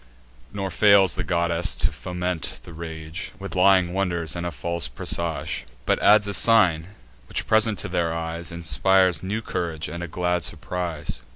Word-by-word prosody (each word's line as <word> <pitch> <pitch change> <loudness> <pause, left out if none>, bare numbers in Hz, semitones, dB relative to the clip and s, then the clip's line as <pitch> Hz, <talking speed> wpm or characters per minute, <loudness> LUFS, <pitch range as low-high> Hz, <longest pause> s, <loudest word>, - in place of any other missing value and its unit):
Nor 95 -2 -4
fails 100 -4 +5
the - - -3
goddess 85 0 0
to - - 0
foment 90 -3 -4
the 85 - -12
rage 80 +1 -7
With 100 0 -7
lying 90 -1 +4
wonders, 90 -4 -1
and 85 0 -3
a - - -4
false 85 +1 -2
presage; 85 -6 -1 0.2
But - - +1
adds 105 0 +5
a 100 - -3
sign, 90 -8 +4 0.4
which, - - -3
present 110 -1 +2
to - - -4
their 85 -2 -1
eyes, 85 0 -4
Inspires 90 +1 +2
new 105 +4 -3
courage, 80 -5 -3
and 85 - -6
a 85 - -4
glad 90 +1 -1
surprise. 85 -1 -4
85 Hz, 165 wpm, -24 LUFS, 85-95 Hz, 0.4 s, fails